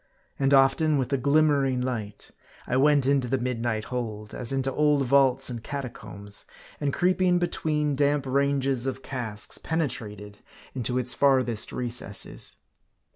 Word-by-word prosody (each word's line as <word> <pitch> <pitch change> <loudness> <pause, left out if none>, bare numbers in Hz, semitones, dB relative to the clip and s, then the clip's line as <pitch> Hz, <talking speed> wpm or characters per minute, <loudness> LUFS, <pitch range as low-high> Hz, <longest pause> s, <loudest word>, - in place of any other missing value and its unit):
And 135 0 +2
often, 140 +3 +4
with 130 0 -2
a - - +3
glimmering 140 -1 +2
light, 120 -5 -5 0.3
I 125 - -2
went 145 0 +4
into 135 -2 +2
the 135 +2 0
midnight 120 -3 -2
hold, 110 -4 -4
as 120 - -3
into 135 0 -1
old 150 -2 +2
vaults 135 0 +3
and 120 -3 -5
catacombs; 110 -7 -4 0.3
and 145 -2 0
creeping 180 +1 +2
between 150 -4 0
damp 145 0 +1
ranges 135 -1 +1
of 130 0 -4
casks, 115 -5 -4
penetrated 105 - -4 0.3
into 125 -1 -1
its 125 -1 +1
farthest 130 -5 +2
recesses. 120 -5 -2
130 Hz, 135 wpm, -26 LUFS, 120-140 Hz, 0.3 s, often